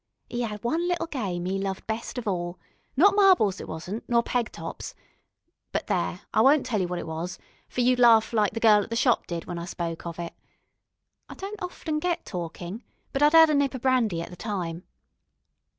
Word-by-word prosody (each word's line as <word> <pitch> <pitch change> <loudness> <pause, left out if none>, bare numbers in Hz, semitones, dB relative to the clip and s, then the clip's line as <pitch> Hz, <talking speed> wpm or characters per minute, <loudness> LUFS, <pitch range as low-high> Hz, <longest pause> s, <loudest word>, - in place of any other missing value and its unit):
'E 240 0 -1
'ad 210 -3 -5
one 325 +9 0
little 350 -2 0
game 195 - -3
'e 190 +1 -1
loved 195 -1 -3
best 225 +3 -4
of 245 - -4
all 175 -2 -2 0.4
not 385 +7 +6
marbles, 375 - +4
it - - -8
wasn't, 180 +8 -5
nor 235 -1 +3
peg 240 -2 -1
tops - - -7 0.8
but - - -2
there, - - -1
I - - +4
won't 280 +1 +5
tell 215 -5 0
you 180 - 0
what 180 0 -3
it - - -4
was, 165 +3 -5 0.3
for 250 - -1
you'd 250 +1 +3
laugh 230 -2 +6
like 210 -3 +2
the 225 - -3
gal 215 -2 +6
at 205 - -6
the 230 - -2
shop 240 +1 +2
did 170 -2 -4
when 175 -1 -5
I 170 - -5
spoke 170 -1 -5
of 170 - -6
it. 170 -1 -5 1.0
I - - -8
don't 405 +2 -7
often 325 -4 -3
get 345 +1 -1
talkin', 175 +3 -6 0.3
but 275 - -1
I'd 295 +2 +5
'ad 320 -1 +8
a - - +2
nip 280 -2 +2
of 255 - -6
brandy 230 -10 +2
at - - -9
the - - -8
time. 180 -4 -4
220 Hz, 215 wpm, -26 LUFS, 180-270 Hz, 1.0 s, ad